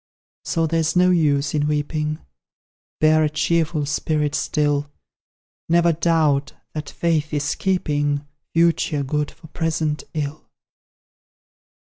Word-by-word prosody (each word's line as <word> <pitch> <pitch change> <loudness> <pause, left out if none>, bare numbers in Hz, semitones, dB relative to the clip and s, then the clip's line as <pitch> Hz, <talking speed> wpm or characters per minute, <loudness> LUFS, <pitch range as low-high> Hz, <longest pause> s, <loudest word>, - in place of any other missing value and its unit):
So 165 -2 0
there's 160 +1 0
no 180 0 +5
use 145 -4 +2
in 150 -1 +1
weeping, 150 +1 -1 0.8
Bear 155 0 +4
a 155 - +2
cheerful 155 0 0
spirit 150 0 0
still; 145 -1 0 0.8
Never 170 0 +4
doubt 155 -4 +1 0.2
that 155 -1 -5
Fate 160 -2 0
is 145 0 0
keeping 145 -6 0 0.3
Future 165 -3 +2
good 150 +2 -1
for 165 - -17
present 160 -2 -1
ill! 150 0 -4
155 Hz, 110 wpm, -22 LUFS, 145-165 Hz, 0.8 s, no